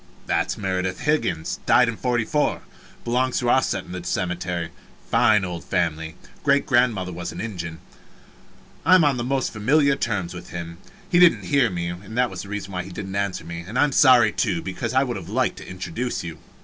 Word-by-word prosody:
That's - - 0
Meredith 95 -2 -2
Higgins 95 - 0
died 125 0 +6
in 115 - -2
'44 125 +5 0 0.4
belongs 125 +2 0
to 120 -1 +2
our 130 - +5
set 95 -6 -2
in - - -11
the 90 -1 -6
cemetery 90 -2 -2 0.4
fine 110 -4 +4
old 85 -2 -5
family 80 -1 -1 0.3
great 140 -1 +3
grand 125 -3 +3
mother 90 -1 -4
was 85 0 -5
an - - -8
Injun 85 -7 -5 1.1
I 185 +5 +6
am 180 - +5
on 140 -4 +3
the 120 - -2
most 135 +1 -1
familiar 140 +6 +3
terms 100 -9 -2
with 90 0 -9
him 85 -1 -7 0.3
he 175 - +3
didn't 175 -1 +6
hear 140 -5 +3
me 85 -1 -3
was 105 +2 -2
the 100 - -10
reason 100 -1 -5
he 95 - -10
didn't 95 +1 -6
answer 100 -1 -1
me. 85 0 -6
And 100 +8 -6
I 135 - +5
am 145 - +1
sorry, 130 -3 +6
too, 95 -7 0
because 115 +6 -4
I 130 - +5
would 120 -5 -3
have 90 -2 -9
liked 125 +4 0
to - - -10
introduce 90 +7 -4
you. 85 -2 -7
105 Hz, 200 wpm, -23 LUFS, 90-125 Hz, 1.1 s, died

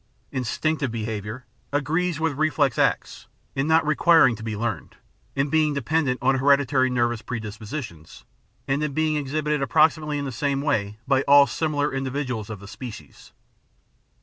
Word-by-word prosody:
Instinctive 140 +2 -1
behaviour 110 +1 -5 0.3
agrees 160 +4 0
with 160 -2 0
reflex 145 -2 +1
acts - - 0 0.3
in 135 +2 0
not 160 0 +4
requiring 155 -4 +5
to 110 - -11
be 110 -1 -4
learned, 115 +1 -4 0.4
in 140 +1 0
being 155 -2 +2
de 140 - -1
pendent 145 -2 +1
on 130 0 +3
hereditary 140 -1 +3
nervous 120 -2 0
predispositions, 110 - -7 0.4
and 140 +2 0
in 150 -2 -2
being 155 +1 +1
exhibited 150 +1 -1
approximately 150 +2 +2
in 140 - -3
the 135 - -4
same 140 +3 -1
way 105 -8 -1
by 135 -1 +3
all 140 0 +8
similar 145 -1 -1
in 135 0 -2
dividuals 125 -5 -3
of 105 -2 -6
the 100 - -12
species. 105 - -10
135 Hz, 155 wpm, -24 LUFS, 120-150 Hz, 0.4 s, all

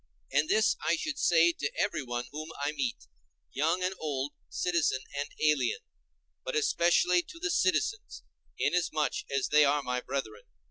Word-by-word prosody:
And 145 +2 +2
this 215 0 +3
I - - +2
should 310 -2 -4
say 170 0 +5
to 145 -3 -3
everyone 120 -2 -1
whom 155 +2 -6
I 145 +1 0
meet, 130 - -3 0.5
young 165 +6 0
and 185 +1 0
old, 145 -2 -3 0.2
citizen 165 -7 0
and 145 0 -3
alien, 150 - +2 0.6
but - - -4
especially 180 - +3
to 335 - -13
the 380 +3 -2
citizens, 425 +3 0 0.3
inasmuch 155 -4 0
as 140 -1 0
they 150 0 +6
are 145 0 +2
my 125 -1 -1
brethren. 110 -7 -5
155 Hz, 150 wpm, -30 LUFS, 140-180 Hz, 0.6 s, they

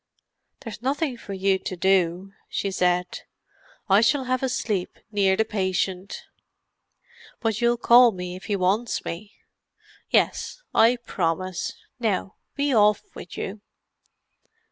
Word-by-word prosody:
"There's 220 -3 -8
nothing 275 +1 -1
for 205 -4 -8
you 190 0 +1
to 185 - -5
do," 185 +1 +1 0.2
she 200 - -2
said. 180 -1 0 0.7
"I 200 +1 +5
shall 270 +4 +3
have 255 0 -1
a 265 - 0
sleep 205 -7 -2
near 195 -2 +2
the 220 - +2
patient." 190 -2 -2 1.2
"But 225 -2 -1
you'll 240 0 +3
call 240 +1 +7
me 180 -2 -6
if 185 - -10
he 205 - 0
wants 200 +5 0
me?" 200 +5 -6 0.8
"Yes—I 250 - +2
promise. 180 -1 -2 0.3
Now 205 -3 -1 0.2
be 285 -1 +1
off 210 -2 +4
with - - -10
you." 200 +2 -5
200 Hz, 125 wpm, -24 LUFS, 185-235 Hz, 1.2 s, call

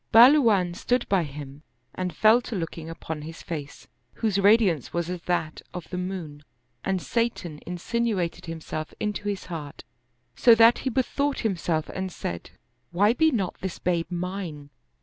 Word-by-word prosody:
Bahluwan 230 -8 +6
stood 245 +6 0
by 195 -2 +3
him 145 0 -9 0.3
and 185 -1 -3
fell 220 +3 +5
to 235 - -6
looking 165 -2 -4
'upon 160 -1 -6
his 160 +2 -9
face, 150 -4 -7 0.3
whose 210 -4 0
radiance 200 - +4
was 170 0 -2
as 180 -1 -5
that 160 -3 -1
of 180 -3 -6
the 180 - -3
moon, 175 -6 -5 0.4
and 190 -1 0
Satan 180 -8 -2
insinu 215 +4 -1
ated 170 0 -3
himself 155 -1 -5
into 210 -1 -2
his 200 -2 -4
heart, 155 -5 -7 0.5
so 235 - +7
that 230 +1 +6
he 265 - -1
bethought 275 +3 0
himself 170 -6 -1
and 190 0 -4
said, 85 - -5 0.2
" - - -46
Why 205 +6 +4
be 320 +5 +4
not 205 - -2
this 190 -2 -4
babe 170 -2 -1
mine 175 -5 -5
180 Hz, 165 wpm, -26 LUFS, 165-220 Hz, 0.5 s, so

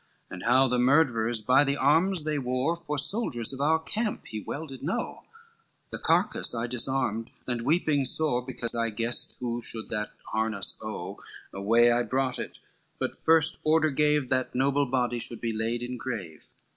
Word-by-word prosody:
And - - -7
how 135 +1 +4
the 125 -1 0
murtherers 120 -5 +2
by 130 +4 +5
the 140 0 -1
arms 165 +5 +2
they 155 -1 -1
wore, 130 +5 -1
For 165 -3 -5
soldiers 140 - +1
of 135 - -6
our 155 +3 +3
camp 210 +7 -3
he 110 - -6
well 145 +9 -6
did 135 -4 -10
know; 160 +6 -4 0.7
The - - -6
carcass - - +1
I 115 +1 -2
disarmed 120 -2 -1 0.2
and 120 -2 -2
weeping 150 0 +1
sore, 130 -4 +3
Because 120 -2 -5
I 115 -1 0
guessed 115 +2 +1
who 120 -1 -3
should 110 -1 -6
that 105 -1 -3 0.2
harness 110 -2 0
owe, - - -6 0.3
Away 115 +5 +3
I 120 +1 +2
brought 130 +1 -1
it, - - -6 0.4
but - - -3
first 160 -1 +4
order 155 0 +3
gave, 150 -1 +2
That 130 -1 -1
noble 140 +2 +2
body 125 -2 0
should 115 0 -4
be 115 -1 -2
laid 115 +2 -2
in 125 +1 -5
grave. 105 -12 -6
125 Hz, 175 wpm, -27 LUFS, 115-145 Hz, 0.7 s, by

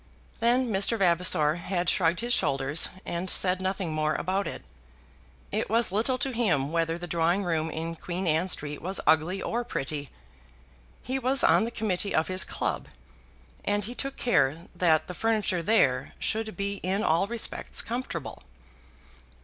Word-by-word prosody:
Then 245 +2 +2
Mr. 200 +3 +3
Vavasor 170 -4 +3
had 175 0 -2
shrugged 170 +2 +2
his 240 +1 +1
shoulders 140 - +2 0.2
and 175 +2 -2
said 185 +1 +2
nothing 185 -3 -2
more 155 0 0
about 190 +3 -1
it. - - -6 0.9
It - - -1
was 230 -2 +2
little 230 +6 +1
to 270 0 -1
him 160 - +1
whether 165 0 0
the 175 - -6
drawing 170 +3 +1
room 160 -3 -1
in 165 +1 -4
Queen 180 +3 -4
Anne 165 +3 +1
Street 150 -4 -2
was 190 +3 -2
ugly 165 +5 +2
or 240 +1 -2
pretty. 145 - -4 0.9
He 260 +1 -2
was 265 +1 +2
on - - +4
the - - -3
committee 205 -4 -1
of 160 +3 +1
his 185 0 +2
club, - - -3 0.8
and 205 -1 0
he 240 - -6
took 275 +2 -3
care 165 - +1
that 160 -3 +2
the 180 - -7
furniture 215 -3 0
there 135 - +2
should 220 0 -2
be 200 0 -2
in 195 +3 -1
all 170 0 +2
respects 235 0 -1
comfortable. 225 - -5
185 Hz, 160 wpm, -27 LUFS, 165-220 Hz, 0.9 s, on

